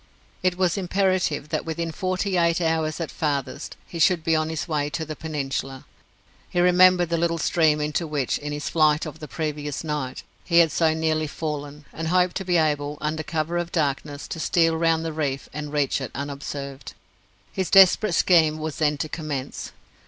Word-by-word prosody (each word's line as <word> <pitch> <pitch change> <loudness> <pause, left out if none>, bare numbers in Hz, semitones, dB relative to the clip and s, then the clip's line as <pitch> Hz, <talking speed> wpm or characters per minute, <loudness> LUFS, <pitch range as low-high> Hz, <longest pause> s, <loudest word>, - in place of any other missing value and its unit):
It 180 -1 +1
was 185 +1 +1
imperative 185 -5 0
that - - -1
within 165 0 -3
forty 185 +3 -1
eight 170 -1 +3
hours 160 -2 0
at 165 - -4
farthest 145 -1 -3
he 170 - -8
should 165 0 +3
be 165 0 +2
on 155 0 0
his 160 +1 -3
way 150 -3 -1
to 160 +2 -3
the 155 0 -6
peninsula. 135 -3 -4 0.6
He 175 - -1
remembered 180 0 +5
the 170 -1 0
little 170 0 +1
stream 155 -1 +2
into 150 +3 -1
which 145 -4 -1
in 150 0 -5
his 145 0 -4
flight 155 -1 +3
of 155 0 -8
the 155 - -7
previous 150 -2 -4
night 150 -5 -4 0.2
he 170 - +1
had 165 -2 +6
so 160 -2 +2
nearly 155 -1 0
fallen, 150 -1 -5
and 165 0 -4
hoped 180 +1 +2
to 195 - -3
be 180 -2 +2
able, 150 -2 0
under 155 +1 -2
cover 165 +2 -2
of 175 - -2
the 170 - -2
darkness, 145 0 -2
to 165 - -5
steal 165 0 +2
round 165 0 +1
the 160 - -3
reef 140 -3 -2
and 150 -1 -5
reach 145 -2 0
it 130 - -4
unobserved. 140 0 -6 0.6
His 190 -2 -2
desperate 195 0 +6
scheme 160 -3 +4
was 155 -1 -4
then 150 -1 +1
to 155 - -2
commence. 150 -4 -5
155 Hz, 190 wpm, -24 LUFS, 150-170 Hz, 0.6 s, had